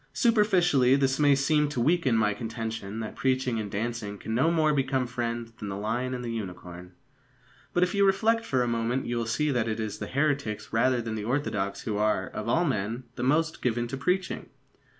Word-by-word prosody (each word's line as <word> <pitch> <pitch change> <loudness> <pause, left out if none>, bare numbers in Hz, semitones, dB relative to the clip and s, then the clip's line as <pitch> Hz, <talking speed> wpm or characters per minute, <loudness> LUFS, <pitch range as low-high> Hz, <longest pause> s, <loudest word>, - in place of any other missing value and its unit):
Superficially, 185 - +4
this 135 0 +1
may 145 -2 +5
seem 150 +2 +2
to 145 - -3
weaken 135 -2 +2
my 105 -1 +2
contention 110 -2 -5
that 110 - -6
preaching 130 -3 0
and 105 -2 -4
dancing 105 0 -3
can 110 - -5
no 130 +8 +3
more 155 -2 +3
become 135 -2 +1
friends 120 -1 -3
than 110 -3 -7
the 95 - -4
lion 120 +5 -2
and 125 - -5
the 115 - -3
unicorn. 90 -4 -7 0.8
But, 175 - +2
if 180 - 0
you 200 -1 +3
reflect 220 +4 +3
for 130 - +1
a - - -1
moment, 120 +2 -1
you 120 - -2
will 115 -1 -2
see 150 +6 +1
that 120 -4 0
it 110 0 -2
is 110 -2 -4
the - - -4
heretics 140 -6 -1
rather 120 +1 +2
than 115 -1 -4
the 105 -1 -4
orthodox 105 -7 -1
who 105 -2 -3
are, 105 -3 +1
of 110 - -5
all 170 +8 +3
men, 115 -2 -2
the - - -5
most 160 +6 +1
given 120 -1 0
to 135 - -3
preaching. 180 +7 -1
120 Hz, 210 wpm, -27 LUFS, 110-145 Hz, 0.8 s, may